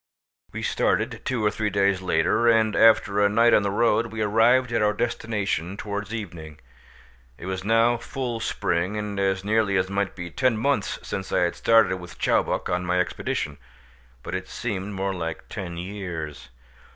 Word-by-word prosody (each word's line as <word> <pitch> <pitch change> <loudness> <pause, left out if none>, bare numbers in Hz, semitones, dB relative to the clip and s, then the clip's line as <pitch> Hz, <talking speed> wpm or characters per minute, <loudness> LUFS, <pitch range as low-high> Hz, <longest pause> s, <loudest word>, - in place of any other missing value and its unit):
We - - -6
started - - 0
two 120 -5 -1
or 105 - +3
three 105 0 -1
days 100 -1 +1
later, 90 +6 +2
and 110 -2 +3
after 105 -2 +4
a 100 - +4
night 115 +3 +4
on - - +6
the 100 - -1
road, 115 +2 +2
we 110 -1 -3
arrived 120 +4 +3
at 115 - +1
our 105 0 +3
destination 105 -5 -2
towards 105 0 -5
evening. 80 -9 -7 0.8
It 85 - -10
was 95 0 -4
now 115 +3 +3
full 120 -1 -4
spring, 95 -2 -1
and 105 -1 -4
as 95 0 0
nearly 105 -2 +2
as 95 +1 0
might 100 0 -1
be 90 -2 -7
ten 130 0 +1
months 110 -4 0
since - - -4
I - - +2
had - - +1
started 115 -5 +4
with 90 -1 -11
Chowbok - - +1
on 90 0 -1
my 90 +1 0
expedition, 75 -4 -2 0.6
but - - -6
it 95 0 -4
seemed 100 -3 -4
more 95 +1 -1
like 80 -3 -5
ten 85 -2 -6
years. 85 -8 -6
100 Hz, 175 wpm, -24 LUFS, 95-110 Hz, 0.8 s, on